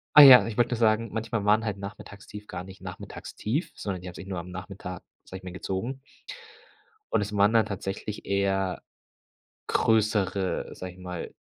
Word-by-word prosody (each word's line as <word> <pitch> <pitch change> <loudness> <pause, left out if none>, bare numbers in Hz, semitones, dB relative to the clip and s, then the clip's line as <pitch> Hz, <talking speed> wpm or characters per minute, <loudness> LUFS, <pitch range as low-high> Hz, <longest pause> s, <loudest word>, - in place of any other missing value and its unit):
Ah, 150 - +12
ja, 135 -3 +11
ich 115 -2 -5
wollte 120 0 +2
nur - - -5
sagen, 110 0 +3
manchmal 110 0 -2
waren 105 +2 +3
halt 105 -2 -3
Nachmittagstief 100 +1 -9
gar 90 - -6
nicht 95 +1 -12
Nachmittagstief, 135 - -4
sondern 95 -3 -4
die 90 - -8
haben 90 - -7
sich 95 - -9
nur 95 -2 -4
am 85 +1 -6
Nachmittag, 90 0 -7 0.2
sage 95 - -8
ich - - -22
mal 90 - -7
gezogen 105 +8 -4 1.1
und - - +3
es 105 0 -3
waren 100 +2 +5
dann 110 -2 +4
tatsächlich 100 +1 -5
eher 95 -1 0 0.9
größere, 100 -4 +1
sage 90 -1 -7
ich - - -19
mal 90 -2 -6
100 Hz, 180 wpm, -27 LUFS, 95-110 Hz, 1.1 s, Ah